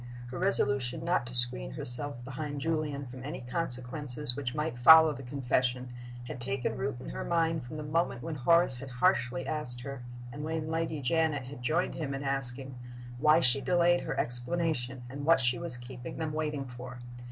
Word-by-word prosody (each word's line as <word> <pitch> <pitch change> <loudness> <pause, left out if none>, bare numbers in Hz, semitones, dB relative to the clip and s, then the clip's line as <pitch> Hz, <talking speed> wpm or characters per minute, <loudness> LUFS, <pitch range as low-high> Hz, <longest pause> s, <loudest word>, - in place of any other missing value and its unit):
Her 130 - -6
resolution 135 -6 +2
not 170 -8 0
to 125 - -3
screen 90 - +3
herself 125 +1 -2
behind 145 +2 -6
Julian 150 -2 -3
from 130 0 -11
any 145 +1 -7
consequences 125 -1 +2
which 130 -1 -5
might 150 -5 -4
follow 160 +4 +7
the 135 - -10
confession 125 -1 -2 0.3
had 125 0 -8
taken 130 +1 -3
root 135 0 -3
in - - -9
her - - -6
mind 165 -2 0
from 155 - -8
the 155 - -6
moment 150 -5 -2
when 165 - -5
Horace 155 0 +2
had 135 +2 -9
harshly 125 +1 0
asked 140 -6 -4
her 140 0 -8 0.3
(and 145 - -7
when 160 0 -4
Lady 160 -2 -3
Janet 155 0 0
had 125 0 -11
joined 155 +7 -1
him 140 -4 -5
in 135 - -6
asking) 135 -1 -4 0.4
why 155 +3 +4
she 135 -1 +9
delayed 175 +1 +2
her - - -4
explanation, 125 0 +2
and 140 +3 -8
what 165 +1 +4
she 125 -2 +3
was 125 - -2
keeping 125 0 -10
them 160 -2 -4
waiting 150 -3 -3
for. 125 0 -10
135 Hz, 185 wpm, -29 LUFS, 125-155 Hz, 0.4 s, she